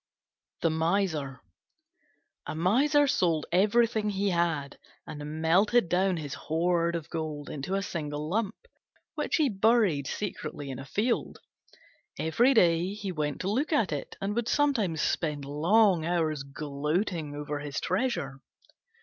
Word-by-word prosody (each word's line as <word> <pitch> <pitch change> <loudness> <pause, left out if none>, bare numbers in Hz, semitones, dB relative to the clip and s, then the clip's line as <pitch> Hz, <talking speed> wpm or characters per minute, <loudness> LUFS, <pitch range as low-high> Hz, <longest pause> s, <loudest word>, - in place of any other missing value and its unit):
THE 165 - +2
MISER 160 -5 0 1.1
A - - -4
Miser 270 - +3
sold 170 - +1
everything 215 +3 +3
he 200 0 0
had, 165 -5 -1 0.3
and 150 +1 -6
melted 190 +5 +3
down 185 +1 +2
his 145 -3 -5
hoard 170 +3 0
of 165 -3 -4
gold 155 -3 -4
into 150 +7 -3
a 195 - -1
single 150 -5 -4
lump, 210 +4 -1 0.6
which - - -1
he 310 -4 +3
buried 205 - +2
secretly 155 -8 -5
in 130 - -6
a 135 - -8
field. 225 - -1 0.8
Every 235 +12 +3
day 175 0 +3
he 205 -2 -4
went 150 -4 -2
to 190 - -1
look 275 +10 0
at 230 - +2
it, 145 -2 -4
and 195 +1 -2
would 235 +1 -1
sometimes 230 - +1
spend 150 -4 -1
long 175 +5 +3
hours 160 -3 0
gloating 150 +3 -3
over 145 0 -4
his 145 0 -4
treasure. 175 - -2
170 Hz, 140 wpm, -28 LUFS, 150-205 Hz, 1.1 s, Miser